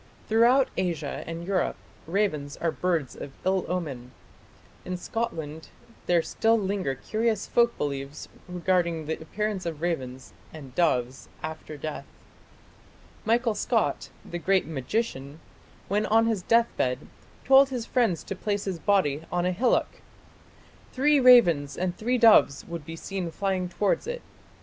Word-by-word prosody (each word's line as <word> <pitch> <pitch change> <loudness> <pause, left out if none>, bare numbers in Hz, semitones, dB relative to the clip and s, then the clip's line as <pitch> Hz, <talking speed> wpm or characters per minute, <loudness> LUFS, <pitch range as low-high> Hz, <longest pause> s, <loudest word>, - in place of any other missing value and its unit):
Throughout 240 +4 +4
Asia 170 -6 -2
and 165 +1 -5
Europe 190 -1 0 0.3
ravens 160 -6 -1
are 165 - 0
birds 165 -8 -1
of - - -7 0.2
ill 190 0 +1
omen. 140 -9 -4 0.7
In 180 0 -4
Scotland 160 -7 -4 0.4
there 175 -2 +3
still 225 +6 +2
linger 195 -9 -1
curious 220 - -1
folk 235 0 +2
beliefs 140 0 -4 0.2
regarding 175 -2 0
the 160 +1 -4
appearance 210 +3 -3
of 165 -3 -4
ravens 130 - -4 0.2
and 140 -5 -11
doves 130 -6 0
after 155 -1 -6
death. 155 +1 -6 1.2
Michael 230 0 +2
Scott, - - 0 0.2
the 175 - -5
great 190 +2 +2
magician, 145 - -3 0.5
when 205 +2 0
on 225 +1 +4
his 225 -4 0
deathbed 180 - +1 0.4
told 270 +1 +7
his 245 -4 -4
friends 225 -10 +1
to 195 - -5
place 205 +1 -2
his 190 -4 -3
body 170 -8 +2
on 175 0 0
a 180 - +2
hillock. 235 +8 0 0.9
"Three 290 +2 +3
ravens 175 - +6
and 180 0 -1
three 245 +5 0
doves 225 - +5
would 170 -3 -7
be 165 - -6
seen 185 +1 -4
flying 185 0 -2
towards 205 - 0
it. - - -4
180 Hz, 140 wpm, -26 LUFS, 155-215 Hz, 1.2 s, told